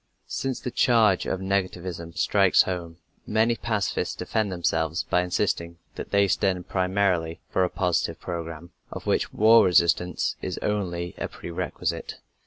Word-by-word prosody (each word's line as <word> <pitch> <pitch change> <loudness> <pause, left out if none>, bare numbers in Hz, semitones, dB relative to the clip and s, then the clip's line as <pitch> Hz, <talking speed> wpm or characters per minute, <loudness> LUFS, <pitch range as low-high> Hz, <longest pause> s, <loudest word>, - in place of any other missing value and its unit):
Since 135 -2 -3
the 125 - -4
charge 110 -7 +3
of 95 - -2
negativism 90 -3 -3
strikes 100 -2 +4
home, 85 -3 -5 0.3
many 110 +2 +2
pacifists 110 -4 -2
defend 110 -3 -1
themselves 80 -2 0
by 90 - +1
insisting 85 -1 -1 0.2
that - - -7
they 100 0 +3
stand 95 -2 0
primarily 90 -3 0
for 95 - +2
a 90 - +1
positive 85 -2 -1
program, 85 -1 -6 0.2
of - - -8
which - - 0
war 110 +2 +6
resistance 90 0 +2
is - - -4
only 90 -5 -2
a - - -2
pre 85 - -9
requisite. 85 - -3
90 Hz, 145 wpm, -25 LUFS, 85-100 Hz, 0.3 s, war